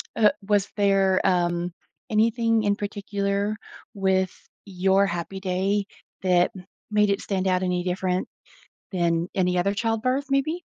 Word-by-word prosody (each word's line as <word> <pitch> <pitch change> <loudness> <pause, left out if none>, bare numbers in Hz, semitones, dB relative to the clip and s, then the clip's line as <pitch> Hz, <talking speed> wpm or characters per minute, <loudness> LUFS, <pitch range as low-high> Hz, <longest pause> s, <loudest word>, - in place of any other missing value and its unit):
Uh, 215 -2 +5 0.2
was 205 -2 +2
there, 195 -2 +3
um, 175 -1 +1 0.4
anything 225 +1 +2
in 205 -1 +2
particular 200 0 -2 0.4
with 190 -2 +1 0.3
your 190 0 +2
Happy 175 +2 -4
Day 195 +2 0 0.4
that 180 -2 +3 0.4
made 210 -1 +3
it 200 - 0
stand 190 -1 -1
out 185 0 +2
any 180 -1 0
different 180 0 -1 0.6
than 170 -2 0
any 180 -1 +1
other 200 +3 +1
childbirth, 235 +6 0
maybe? 310 +6 0
195 Hz, 130 wpm, -25 LUFS, 185-210 Hz, 0.6 s, Uh